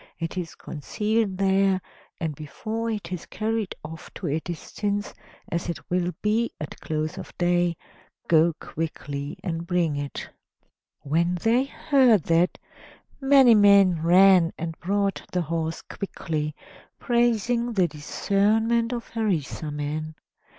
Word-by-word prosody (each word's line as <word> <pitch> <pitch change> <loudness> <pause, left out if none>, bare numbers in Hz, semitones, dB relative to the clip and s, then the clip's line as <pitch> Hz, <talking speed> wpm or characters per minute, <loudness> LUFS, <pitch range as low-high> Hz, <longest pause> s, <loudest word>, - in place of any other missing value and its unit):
It 165 0 -4
is 175 -3 -4
concealed 210 +5 -2
there, 195 0 +3 0.4
and 160 -3 -2
before 215 +11 -4
it 205 -6 -4
is 180 -2 -5
carried 220 -2 -2
off 160 +1 -9
to 195 - -6
a 155 0 0
distance, 200 +5 -4 0.4
as 170 +1 -2
it 170 - -6
will 180 0 +1
be 220 +3 +1
at 150 - -7
close 155 0 -3
of - - -8
day, 175 -1 +2 0.5
go 165 0 +4
quickly 145 -3 -5
and 170 -1 -3
bring 170 -4 +1
it." 145 -1 -5 0.7
When 170 +5 +1
they 240 +4 +3
heard 265 - +3
that, 170 +3 +2 0.6
many 270 -3 +7
men 200 -5 +6
ran 180 0 +6
and 165 0 -4
brought 200 +2 0
the 180 -1 0
horse 165 0 -3
quickly, 155 -6 -4 0.4
praising 240 0 +1
the 185 -4 +3
discernment 215 +9 +1
of 235 -1 -5
Harisarman. 155 - -2
180 Hz, 125 wpm, -25 LUFS, 160-215 Hz, 0.7 s, many